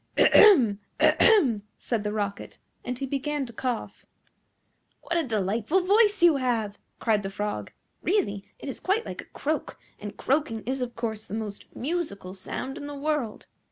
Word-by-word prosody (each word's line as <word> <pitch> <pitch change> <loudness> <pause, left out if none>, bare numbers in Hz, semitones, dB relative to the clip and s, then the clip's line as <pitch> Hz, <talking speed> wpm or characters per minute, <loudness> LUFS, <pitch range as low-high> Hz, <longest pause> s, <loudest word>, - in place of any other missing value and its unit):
"Ahem! 255 - +7 0.2
ahem!" 275 - +5 0.2
said 230 -4 -2
the 210 - -1
Rocket, 200 -2 -4 0.3
and 250 0 -4
he 270 - -3
began 280 +1 -2
to 235 - -11
cough. 245 0 -4 1.0
"What 340 - -3
a 335 - +2
delightful 220 - 0
voice 415 -1 +4
you 335 -4 +7
have!" 230 -6 -1 0.2
cried 215 -3 +2
the 195 - -4
Frog. 205 +1 -4 0.3
"Really 270 - 0
it - - -9
is 270 - -5
quite 415 +5 0
like - - -6
a - - -15
croak, 310 +2 -3 0.2
and 205 0 -7
croaking 270 -5 0
is 260 +2 -2
of 240 -1 -4
course 220 -2 -4
the 205 - -5
most 210 -2 -6
musical 260 - -3
sound 260 - -5
in 285 - -6
the 290 - -6
world. 285 -6 -2
250 Hz, 165 wpm, -27 LUFS, 210-305 Hz, 1.0 s, Ahem